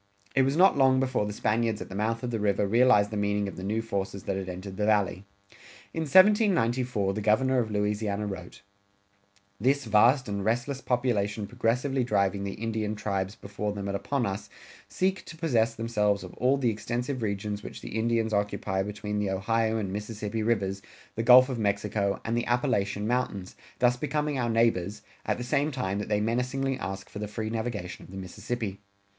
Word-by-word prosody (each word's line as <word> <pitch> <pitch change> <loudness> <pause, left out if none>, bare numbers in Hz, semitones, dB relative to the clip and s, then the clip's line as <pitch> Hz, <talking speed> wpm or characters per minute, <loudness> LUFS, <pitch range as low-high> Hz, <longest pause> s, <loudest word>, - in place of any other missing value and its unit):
It 135 - +4
was 135 +3 +1
not 190 +2 +6
long 130 -1 +5
before 130 -5 0
the - - -3
Spaniards 110 +1 0
at - - -6
the - - -10
mouth 110 +4 -1
of 125 - -2
the 115 - -1
river 105 0 +1
realized 115 -2 +4
the 110 - -3
meaning 105 0 0
of 100 - -6
the - - -7
new 110 +3 -1
forces 100 -3 -3
that 95 - -2
had 95 -1 -4
entered 95 +1 -7
the 105 +1 0
Valley. 100 -3 +1 0.7
In 160 -1 -2
1794 125 - +4
the 105 - -3
Governor 130 +5 +3
of 115 -3 -1
Louisiana 105 0 -1
wrote: 95 -3 -7 1.0
This 135 +5 +2
vast 120 +5 +4
and 100 -1 -3
restless 120 +5 -1
population 110 -5 0
progressively 125 +4 0
driving 100 -3 +1
the 100 -1 -4
Indian 110 -1 -2
tribes 100 -1 -2
before 100 +1 -4
them 100 -1 -5
and 100 - -2
upon 130 +5 -1
us, 100 -1 -4 0.4
seek 185 - 0
to 165 - -10
possess 115 -8 +1
themselves 105 -3 0
of 90 - -9
all 130 +2 +3
the 125 -4 +1
extensive 120 +4 -3
regions 105 -1 -2
which - - -9
the - - -7
Indians 115 0 +1
occupy 100 -1 0
between 105 +1 -3
the 105 -1 0
Ohio 110 +4 +1
and 100 -3 -3
Mississippi 105 +1 -4
rivers, 100 -4 0 0.3
the 115 - -2
Gulf 125 +2 +8
of 130 -4 -3
Mexico, 100 -1 0
and 115 - 0
the 120 - -1
Appalachian 105 -4 0
Mountains, 110 -6 -2 0.2
thus 125 0 +3
becoming 150 0 -1
our 120 -1 0
neighbors, 105 -4 +1 0.2
at - - +1
the 125 - -4
same 140 +4 +1
time 105 -9 -2
that 105 - -4
they 105 -1 +2
menacingly 125 +4 0
ask 95 0 -5
for 105 - -8
the 105 - -3
free 110 +1 -4
navigation 110 -5 -4
of - - -14
the 95 - -9
Mississippi. 100 +2 -4
110 Hz, 190 wpm, -28 LUFS, 100-125 Hz, 1.0 s, Gulf